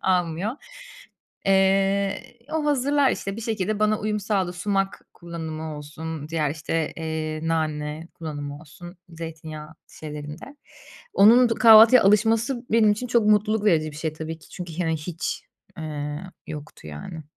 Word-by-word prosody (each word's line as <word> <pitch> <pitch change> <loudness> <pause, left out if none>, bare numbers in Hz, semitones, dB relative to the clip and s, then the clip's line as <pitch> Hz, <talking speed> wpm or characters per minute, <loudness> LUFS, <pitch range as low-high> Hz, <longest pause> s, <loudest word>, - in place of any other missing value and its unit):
almıyor. 180 +3 0 0.9
Eee, 195 +1 +2 0.3
o 315 -1 0
hazırlar 285 -1 +3
işte 195 +1 -4
bir - - -6
şekilde 215 -2 -1
bana 215 0 +3
uyum 210 0 -1
sağladı 195 -3 0
sumak 195 +1 -1
kullanımı 160 -2 -6
olsun, 155 +1 -7
diğer, 155 -3 0
işte, 155 +1 -2
eee, 160 -1 -3
nane 155 0 -2
kullanımı 145 -3 -6
olsun, 175 +3 -12
zeytinyağı 160 -1 -8 0.3
şeylerinde. 150 - -8 0.6
Onun 235 +5 +7
du 230 - +2
kahvaltıya 225 +1 +8
alışması 225 +5 +2
benim 215 -2 +5
için 250 +4 -4
çok 235 -3 +2
mutluluk 210 0 +3
verici 155 -6 +3
bir 145 - -12
şey 160 -1 -3
tabii 160 +1 -6
ki - - -18
çünkü, 175 -2 -8
hani, 160 -2 0
hiç, 165 +2 -4 0.3
eee, 150 -1 -4 0.3
yoktu, 150 - -9
yani, 75 - -8
170 Hz, 140 wpm, -24 LUFS, 155-210 Hz, 0.9 s, kahvaltıya